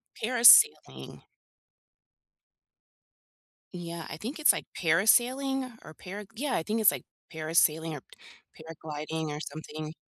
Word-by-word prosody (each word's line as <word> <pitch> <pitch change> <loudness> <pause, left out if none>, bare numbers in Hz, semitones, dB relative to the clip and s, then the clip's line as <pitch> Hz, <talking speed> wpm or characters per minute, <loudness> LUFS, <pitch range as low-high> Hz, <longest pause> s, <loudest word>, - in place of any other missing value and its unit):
Parasailing. 245 - +4 2.5
Yeah, 170 -2 -8
I - - -8
think 240 - -7
it's, 305 - +5
like, - - -6
parasailing 250 - +1
or 155 - -13
para 200 +5 -10
Yeah, 270 +1 -3
I 160 - -2
think 220 +4 -3
it's 210 - +5
like - - -8 0.3
parasailing 160 0 0
or 145 - -8 0.6
paragliding 155 0 -7
or 150 - -6
something. 155 +1 -8
170 Hz, 115 wpm, -27 LUFS, 155-240 Hz, 2.5 s, it's